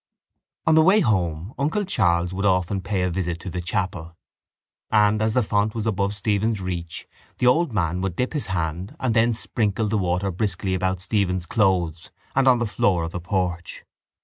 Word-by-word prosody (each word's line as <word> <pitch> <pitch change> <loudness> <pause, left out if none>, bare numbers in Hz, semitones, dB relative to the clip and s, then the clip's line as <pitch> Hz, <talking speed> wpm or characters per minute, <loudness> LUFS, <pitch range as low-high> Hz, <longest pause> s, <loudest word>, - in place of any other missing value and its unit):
On 160 - +4
the 160 - +6
way 195 +6 +5
home 90 - 0
uncle 160 +9 0
Charles 90 - +1
would 100 +2 -3
often 95 0 +1
pay 95 0 -1
a 90 - 0
visit 85 -1 -2
to 95 - -6
the 90 - -3
chapel 90 -2 -3 0.7
and, 105 0 +3
as 110 0 0
the 125 - +3
font 105 +1 0
was 110 -1 -3
above 100 -1 0
Stephen's 105 +1 0
reach, 85 -3 -5 0.3
the - - 0
old 150 +5 +3
man 90 -4 -1
would 95 -2 -2
dip 125 - -1
his 145 -9 -1
hand 90 -1 -3
and 125 -3 0
then 115 0 +3
sprinkle 110 -2 -1
the 105 0 0
water 90 +1 0
briskly 95 0 -2
about 95 0 -1
Stephen's 95 -3 0
clothes 90 -6 0 0.3
and 135 0 +3
on 125 -1 +6
the 120 - -1
floor 95 -5 +1
of 80 - -4
the 90 - -4
porch. 90 -1 -3
95 Hz, 190 wpm, -23 LUFS, 90-110 Hz, 0.7 s, the